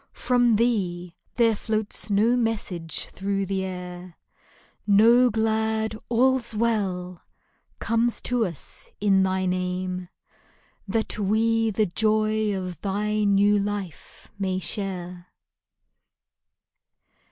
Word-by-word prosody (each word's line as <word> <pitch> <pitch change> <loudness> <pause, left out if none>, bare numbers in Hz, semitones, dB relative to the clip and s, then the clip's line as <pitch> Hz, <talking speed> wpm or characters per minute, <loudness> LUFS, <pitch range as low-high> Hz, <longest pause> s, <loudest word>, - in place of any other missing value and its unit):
From 245 -2 +2
thee 185 -7 0 0.2
there 230 -2 +3
floats 215 0 -3
no 215 +4 +3
message 205 -8 -2
thro' 195 0 -2
the 190 0 -2
air; 180 -1 -7 0.7
No 230 +5 +6
glad 220 0 0
" - - -45
All's 250 -1 +2
well" 190 -6 -1 0.6
comes 230 +1 +1
to 245 -1 0
us 170 -5 -7
in 195 -2 +3
thy 190 0 0
name 180 0 -2 0.8
That 220 +1 -1
we 225 +2 +2
the 215 0 +1
joy 215 +1 +1
of 180 -3 -6
thy 210 +1 -1
new 205 +1 +4
life 200 -4 -6
may 190 -1 -1
share 180 -2 -4
205 Hz, 105 wpm, -25 LUFS, 185-220 Hz, 0.8 s, No